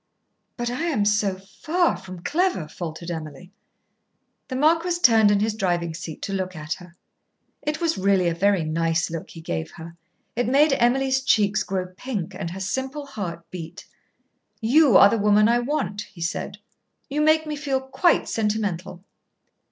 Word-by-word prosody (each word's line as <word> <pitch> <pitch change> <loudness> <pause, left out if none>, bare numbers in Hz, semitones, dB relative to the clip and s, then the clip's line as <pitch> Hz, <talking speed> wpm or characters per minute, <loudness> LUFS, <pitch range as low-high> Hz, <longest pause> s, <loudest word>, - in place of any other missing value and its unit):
"But 240 -1 -2
I 255 +7 -2
am 270 -12 +1
so 210 -2 +1 0.2
far 345 +2 +2
from 185 -2 -10
clever," 320 - 0
faltered 170 +1 -6
Emily. 160 +2 -7 1.0
The 260 - -5
marquis 330 +5 +2
turned 225 -3 +6
in 205 -1 +3
his 220 0 +1
driving 175 -5 -1
seat 165 -1 -8
to 195 - -3
look 185 -1 -3
at 155 +2 -4
her. 180 -2 -13 0.7
It 300 +1 -2
was 335 - 0
really 190 -2 +3
a 170 - +1
very 195 +1 +2
nice 165 +1 0
look 165 -1 -6
he 165 - -10
gave 80 - -4
her. 170 0 -10 0.4
It 245 0 0
made 280 +3 +4
Emily's 265 +2 +2
cheeks 210 -5 +2
grow 190 -1 -2
pink 205 -5 -4
and 185 -2 -5
her 185 +3 -7
simple 265 +9 -3
heart 175 -10 -6
beat. 170 -1 -8 0.7
"You 265 +3 +5
are - - +9
the 225 +2 0
woman 210 +1 +4
I 240 +1 +3
want," 225 -7 -2
he 170 - -13
said. 165 - -3 0.5
"You 295 +2 -1
make 310 +1 +4
me 305 -1 -3
feel 280 -2 -1
quite 265 +6 +1
sentimental." 205 -5 -2
205 Hz, 165 wpm, -24 LUFS, 175-265 Hz, 1.0 s, are